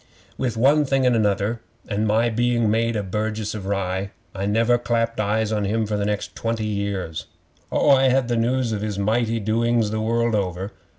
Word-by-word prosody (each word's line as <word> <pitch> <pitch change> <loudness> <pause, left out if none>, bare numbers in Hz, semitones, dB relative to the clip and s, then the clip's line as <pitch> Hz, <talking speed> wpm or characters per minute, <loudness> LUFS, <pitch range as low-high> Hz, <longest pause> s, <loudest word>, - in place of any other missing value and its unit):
'With 125 -3 -2
one 140 +6 +4
thing 135 -1 +1
and 125 -1 +4
another, 105 +1 0 0.3
and 105 +1 -1
my 115 +3 +2
being 120 -1 +1
made 115 +1 +1
a 105 - -1
burgess 105 +2 -3
of 100 -3 -6
Rye, 95 0 -2 0.2
I 100 0 -3
never 115 +3 +3
clapped 115 -1 -1
eyes 110 +1 0
on 105 -1 0
him 110 +3 0
for 105 0 -2
the 100 0 -1
next 105 -1 -3
twenty 115 -1 -2
years. 100 -7 -3 0.4
Oh, 145 - +3
I 135 -1 +5
had 130 -1 +2
the 120 - 0
news 120 +1 +1
of 105 -2 -2
his 105 -2 -3
mighty 115 +3 +1
doings 115 +1 +1
the 110 0 -1
world 115 +1 +1
over. 95 -1 -2
110 Hz, 195 wpm, -23 LUFS, 105-115 Hz, 0.4 s, I